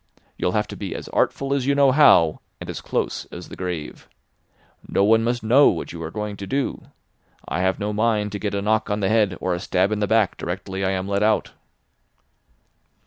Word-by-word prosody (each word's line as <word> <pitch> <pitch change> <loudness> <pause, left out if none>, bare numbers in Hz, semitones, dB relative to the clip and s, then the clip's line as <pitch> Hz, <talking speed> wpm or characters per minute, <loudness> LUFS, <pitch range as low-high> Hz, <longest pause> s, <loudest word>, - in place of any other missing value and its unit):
You'll - - -1
have - - 0
to - - -7
be - - -5
as - - -7
artful 140 0 0
as 135 -2 -1
you 140 - +3
know 140 -2 +5
how, 90 - +5 0.2
and - - -6
as - - -7
close - - -2
as - - -10
the - - -9
grave. 90 -5 -6 0.8
No 100 - +1
one 110 +2 +4
must 120 0 -1
know 130 +6 +6
what - - -4
you 85 - -7
are 80 - -4
going 105 +2 -5
to 100 - -7
do. 135 0 -2 0.6
I 80 - -2
have 95 0 +1
no 105 0 -3
mind 105 -1 +1
to 100 - -4
get 100 -1 -2
a 100 - -2
knock 110 +1 +1
on 105 0 -1
the 95 - +1
head 105 -5 +2
or 90 0 -1
a 85 - -2
stab 95 +3 0
in 105 - -1
the 105 - 0
back 110 -2 +2
directly 95 +2 -4
I 95 - +1
am 95 0 -2
let 100 0 0
out." 105 -2 +1
105 Hz, 220 wpm, -22 LUFS, 95-115 Hz, 0.8 s, know